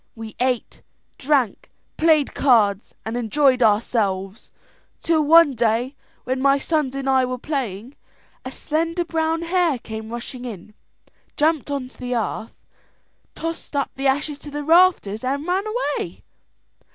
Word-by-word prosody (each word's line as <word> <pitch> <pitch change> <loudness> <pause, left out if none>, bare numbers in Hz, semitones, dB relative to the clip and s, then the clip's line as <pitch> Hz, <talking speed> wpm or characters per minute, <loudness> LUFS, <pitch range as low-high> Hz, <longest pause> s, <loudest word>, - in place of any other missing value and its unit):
We 225 -2 -9
ate, 250 -2 -1 0.4
drank, 270 -6 0 0.3
played 310 -3 +3
cards, 215 -7 +2
and 220 +2 -4
enjoyed 255 +2 +2
ourselves, 205 -2 0 0.5
till 330 -2 +2
one 325 0 +6
day 240 +2 0 0.3
when 260 +1 -2
my 275 0 +4
sons 280 -2 -1
and 275 0 -4
I 265 -1 +4
were 255 0 -2
playing, 245 -4 -4 0.5
a - - -5
slender 330 +3 -2
brown 325 0 -1
hare 340 -4 +1
came 220 -1 -8
rushing 240 +1 -7
in, 215 -4 -8 0.6
jumped 305 -1 +1
on 280 -3 -3
to 255 - -21
the 250 0 -3
hearth, 225 -1 -3 0.8
tossed 330 -2 -6
up 280 - 0
the 270 +1 -1
ashes 290 +2 0
to 295 - -10
the 295 0 -5
rafters 325 - +3
and 280 +3 -2
ran 370 +3 0
away. 475 +4 -3
270 Hz, 140 wpm, -22 LUFS, 235-310 Hz, 0.8 s, one